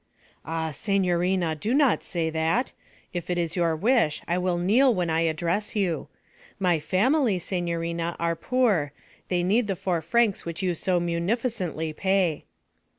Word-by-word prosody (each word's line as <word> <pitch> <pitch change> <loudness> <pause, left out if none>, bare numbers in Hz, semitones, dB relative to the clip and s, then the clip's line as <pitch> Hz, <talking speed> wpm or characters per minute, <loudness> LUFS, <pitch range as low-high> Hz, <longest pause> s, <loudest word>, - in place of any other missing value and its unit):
'Ah, 160 -1 -3
signorina, 180 -2 +1
do 210 - -1
not 280 -5 +3
say 165 -3 -2
that! 160 +10 0 0.4
If 175 -1 -5
it 175 - 0
is 170 -2 -1
your 170 -3 +1
wish 210 - +2
I 170 - +1
will 180 -1 0
kneel 225 +10 +4
when 175 -3 0
I 160 - +2
address 170 +6 -1
you. 180 -8 -1 0.5
My 180 -4 +2
family, 215 - +2
signorina, 170 -1 -2
are 170 0 0
poor; 205 - +1 0.3
they 175 -1 0
need 210 +5 +2
the 195 - -1
four 175 -2 -1
francs 210 +5 +1
which 170 +3 -5
you 180 -1 +1
so 180 +2 0
munificently 175 -2 -2
pay.' 190 -3 0
175 Hz, 150 wpm, -26 LUFS, 165-200 Hz, 0.5 s, kneel